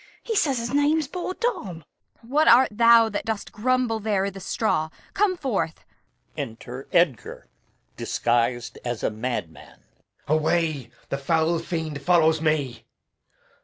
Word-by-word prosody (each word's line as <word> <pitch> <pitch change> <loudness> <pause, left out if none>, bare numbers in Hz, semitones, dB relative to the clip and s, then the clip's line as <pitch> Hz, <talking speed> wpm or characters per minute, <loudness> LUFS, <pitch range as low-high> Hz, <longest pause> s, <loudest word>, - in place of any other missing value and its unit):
He 450 - -3
says 280 -9 +2
his 235 +2 -4
name's 290 +1 +2
poor 360 +4 -5
Tom. 200 - -3
Kent. - - -36 0.5
What 305 +3 +3
art 250 +3 +7
thou 230 +1 +6
that 205 - -3
dost 220 -2 -4
grumble 245 0 0
there 205 -2 0
i' 200 - -2
th' 195 0 -10
straw? 180 -5 0 0.2
Come 390 -2 +1
forth. 200 - -2 0.5
Enter 120 +3 -7
Edgar 170 - +1 0.5
[disguised 120 0 -1
as 120 -2 -4
a - - +1
madman]. 110 -7 -6
Edg. - - -39 0.2
Away! 155 -4 0 0.2
the 140 - -2
foul 160 +3 +1
fiend 160 -4 -4
follows 160 0 +3
me! 145 -7 -1
175 Hz, 140 wpm, -24 LUFS, 140-235 Hz, 0.5 s, art